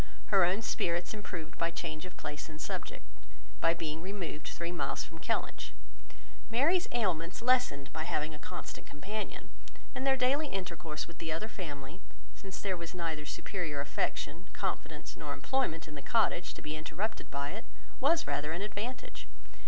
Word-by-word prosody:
Her 195 -2 +9
own 190 +6 +3
spirits 175 -3 +1
improved 175 -6 -5
by 165 - +4
change 165 0 -3
of 180 - -12
place 150 +1 -4
and 155 -1 -7
subject, - - -3 0.5
by 165 +1 +5
being 160 -1 -2
removed 185 -4 -3
three 170 0 -2
miles 175 - 0
from - - -9
Kellynch; - - 0 0.8
Mary's 315 +10 +5
ailments 180 -7 +2
lessened 245 - +4
by 155 0 -1
having 155 -1 +1
a 150 - -8
constant - - -6
companion, 200 +9 -4 0.4
and 265 - 0
their 265 0 +6
daily 275 +4 +4
intercourse 170 - -2
with 170 - -11
the 165 -1 -1
other 165 +7 0
family, 155 -4 -5 0.3
since 195 -2 -6
there 195 -2 +1
was 170 +1 -5
neither 160 -3 -1
superior 170 -7 -1
affection, 145 +3 0
confidence, - - -2
nor - - -3
employment 250 -13 +1
in 150 - -7
the 145 - -5
cottage, 210 0 +3
to - - -8
be 150 +1 -1
interrupted 165 +8 -2
by 140 0 -1
it, 220 +4 -5 0.3
was 325 +5 +5
rather 150 +2 +1
an 175 +4 -1
advantage. 210 +5 -3
170 Hz, 165 wpm, -34 LUFS, 155-215 Hz, 0.8 s, Her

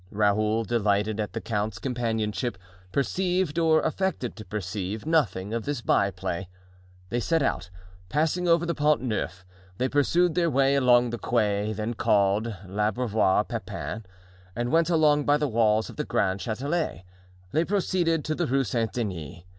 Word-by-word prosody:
Raoul, 105 +2 +1
delighted 105 -1 0
at 105 - -3
the 115 - -3
count's 105 -3 -2
companionship, 110 -1 -2 0.3
perceived, 180 - 0
or 160 -1 +4
affected 185 -8 -1
to 110 - -9
perceive 105 +1 -4
nothing 120 - +1
of 115 -1 -2
this 145 -4 -2
byplay. 95 -2 0 0.6
They 120 - -1
set 165 +5 +1
out, 90 -8 -1 0.4
passing 160 - 0
over 170 0 +4
the 170 - 0
Pont 150 -1 +2
Neuf; 95 -6 -3 0.3
they 130 - +1
pursued 160 +5 +2
their 170 0 +2
way 135 -1 +3
along 125 -3 +4
the 120 - -4
quay 105 -3 0
then 110 +2 -3
called 100 -1 +2 0.2
L'Abreuvoir 105 0 +1
Pepin, 110 -1 -5 0.5
and 120 +1 -2
went 165 +1 +3
along 150 -3 +3
by 145 0 +4
the 150 0 0
walls 110 -2 +2
of - - -11
the 150 - -1
Grand 95 -8 0
Chatelet. 130 - -2 0.5
They 160 - +2
proceeded 175 -4 0
to 155 - 0
the 170 +1 -1
Rue 135 +2 +2
Saint 115 -1 -1
Denis. 85 - -4
115 Hz, 155 wpm, -26 LUFS, 105-150 Hz, 0.6 s, or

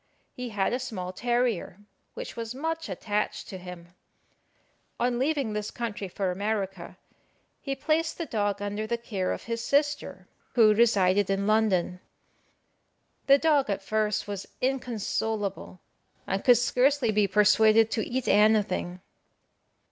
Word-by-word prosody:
He 250 -1 -6
had 205 -1 0
a 250 - 0
small 185 -8 -5
terrier, 240 -5 -1 0.4
which - - -7
was 230 +1 -5
much 325 0 -3
attached 205 +3 -3
to 190 - -7
him. 180 -1 -10 1.1
On 240 0 0
leaving 275 -5 0
this 210 0 -3
country 220 -4 -5
for 185 +1 -2
America, 195 -2 -3 0.6
he 275 -2 -3
placed 320 +4 0
the 335 - -3
dog 205 -5 -1
under 205 +1 -3
the 235 +1 -1
care 200 -6 -3
of - - -4
his 230 0 -4
sister, 290 +1 0 0.3
who 220 -3 +6
resided 205 -4 +3
in 195 0 0
London. 205 -5 +1 1.3
The 275 0 +7
dog 290 -5 +2
at 195 -1 -2
first 215 +1 -1
was 200 -1 -5
inconsolable, 220 -7 -2 0.4
and 195 - -2
could 245 -2 +6
scarcely 250 +1 +2
be 210 -1 +2
persuaded 215 +2 +4
to 220 - 0
eat 255 0 -3
anything. 205 -4 +2
215 Hz, 135 wpm, -27 LUFS, 200-245 Hz, 1.3 s, The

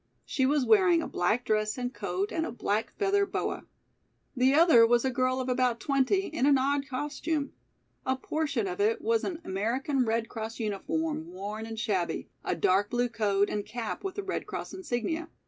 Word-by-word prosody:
She 265 -2 +1
was 285 -2 +2
wearing 360 - +5
a - - -4
black 210 +8 0
dress 215 +1 0
and 250 0 -3
coat 395 +2 -2
and 320 - -1
a 320 - -3
black 220 -1 -1
feather 400 0 +2
boa. 400 - -3 0.7
The 260 +2 +4
other 320 -8 +7
was 240 +1 +3
a 260 - +1
girl 255 +1 +1
of 260 - -3
about 250 -2 +1
twenty 275 - +1
in 310 -6 0
an 285 -1 +6
odd 275 +1 0
costume. 290 +2 -2 0.5
A 260 - +1
portion 280 -4 -1
of 180 +1 -3
it 220 +2 +2
was 225 0 +1
an 340 -4 -3
American 250 +8 0
Red 225 0 0
Cross 225 +1 -6
uniform, 235 - -2
worn 205 +5 -6
and 225 -1 -6
shabby, 190 -6 -1
a - - -1
dark 195 +2 +2
blue 245 0 0
coat 205 -3 +1
and 210 - -2
cap 235 - -5
with 385 -1 -4
the 405 - -3
Red 385 - -3
Cross - - -5
insignia. 320 0 -3
250 Hz, 190 wpm, -29 LUFS, 220-300 Hz, 0.7 s, other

